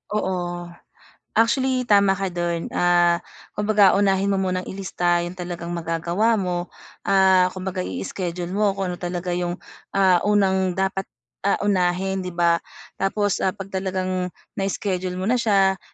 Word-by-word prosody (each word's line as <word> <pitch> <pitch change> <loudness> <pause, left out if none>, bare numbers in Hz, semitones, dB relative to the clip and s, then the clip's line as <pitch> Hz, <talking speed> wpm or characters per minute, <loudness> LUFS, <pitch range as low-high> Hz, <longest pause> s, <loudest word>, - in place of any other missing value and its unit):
Oo. 175 -3 -2 0.7
Actually 255 +2 +2
tama 200 -2 +5
ka 195 0 -1
do'n 175 -1 -2
ah, 175 -1 +4 0.4
kumbaga 210 -2 +4
unahin 195 -1 +2
mo 195 - +1
munang 185 -1 -1
i-lista 175 -2 0
yung 175 +1 -6
talagang 175 -1 -5
magagawa 170 +7 0
mo, 180 -2 -2 0.4
ah, 190 -2 +5
kumbaga 185 0 -4
i-schedule 180 -1 -4
mo 200 0 +1
kung 195 -2 -2
ano 175 - -5
talaga 175 0 -3
'yong 175 0 -1 0.4
ah, 190 -2 +5
unang 190 -3 +2
dapat 195 0 -1 0.4
ah, 200 - +4
unahin 190 -1 +1
'di 180 -2 -6
ba 170 -1 +3 0.4
tapos 205 +1 0
ah, 190 - 0
pag 195 -1 -8
talagang 185 -1 -2 0.3
na-schedule 185 -2 -2
mo 185 - -4
na 245 +5 +2
siya, 195 -4 +3
185 Hz, 145 wpm, -23 LUFS, 175-195 Hz, 0.7 s, tama